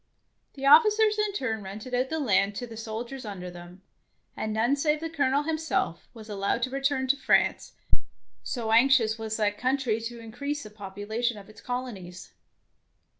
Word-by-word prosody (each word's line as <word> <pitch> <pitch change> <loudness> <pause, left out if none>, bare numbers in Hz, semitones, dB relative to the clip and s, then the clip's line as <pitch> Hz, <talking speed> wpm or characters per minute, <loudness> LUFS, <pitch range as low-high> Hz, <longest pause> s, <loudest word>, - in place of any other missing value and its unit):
The 275 -1 -5
officers 425 +6 +6
in 420 -1 +2
turn 225 - -2
rented 210 +6 -8
out 255 +1 +1
the 320 - -1
land 200 -6 +2
to 245 - -4
the 230 -2 -10
soldiers 230 +4 -5
under 185 -4 -6
them, 175 +2 -12 0.5
and 215 - -3
none 230 +5 +2
save 300 +1 +1
the 325 0 -5
Colonel 285 -2 +2
himself 315 - -1
was 220 -3 -12
allowed 205 +3 -1
to 255 - -1
return 275 0 0
to 275 - +5
France, 275 - +2 0.7
so 230 -4 -3
anxious 230 -2 +5
was 220 0 -3
that 210 -1 0
country 255 -4 +1
to 235 +1 -5
increase 280 +6 -4
the 215 - -10
population 210 +3 -3
of 200 0 -12
its 215 - -15
colonies. 210 -8 -6
235 Hz, 170 wpm, -27 LUFS, 215-275 Hz, 0.7 s, officers